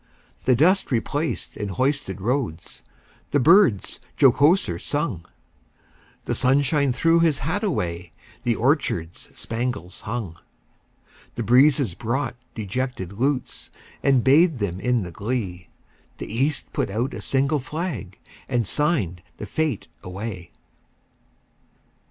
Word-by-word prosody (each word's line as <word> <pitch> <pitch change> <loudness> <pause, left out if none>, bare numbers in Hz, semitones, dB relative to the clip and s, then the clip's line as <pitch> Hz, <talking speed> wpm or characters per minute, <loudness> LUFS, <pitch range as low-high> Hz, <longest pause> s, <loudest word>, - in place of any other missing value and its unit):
The 125 - +5
dust 180 +9 +3
replaced 145 +6 -2
in 105 -1 -4
hoisted 115 -2 -1
roads, 115 - -3 0.5
The 145 - +2
birds 150 - +4 0.2
jocoser 140 - +4
sung; 145 - -2 1.0
The - - -1
sunshine 140 +2 +2
threw 165 +6 +3
his 165 -4 +3
hat 190 +7 -1
away, 85 - -2 0.3
The 120 -1 +1
orchards 110 - -1
spangles 115 -6 -4
hung. 105 -7 -5 1.0
The 115 - -2
breezes 130 - +4
brought 120 +9 -2 0.2
dejected 110 -2 -3
lutes, 130 +5 -2 0.3
And 135 -4 +3
bathed 155 +3 +5
them 95 -5 -2
in 125 0 +1
the 90 - -7
glee; 100 -2 -4 0.5
The - - -6
East 135 +5 -1
put - - -1
out 115 +6 -2
a - - -6
single 140 +2 +1
flag, 150 - -5 0.3
And 120 -2 +1
signed 115 - 0 0.2
the - - -6
fete 150 -1 -2
away. 90 -1 -6
125 Hz, 115 wpm, -23 LUFS, 100-145 Hz, 1.0 s, The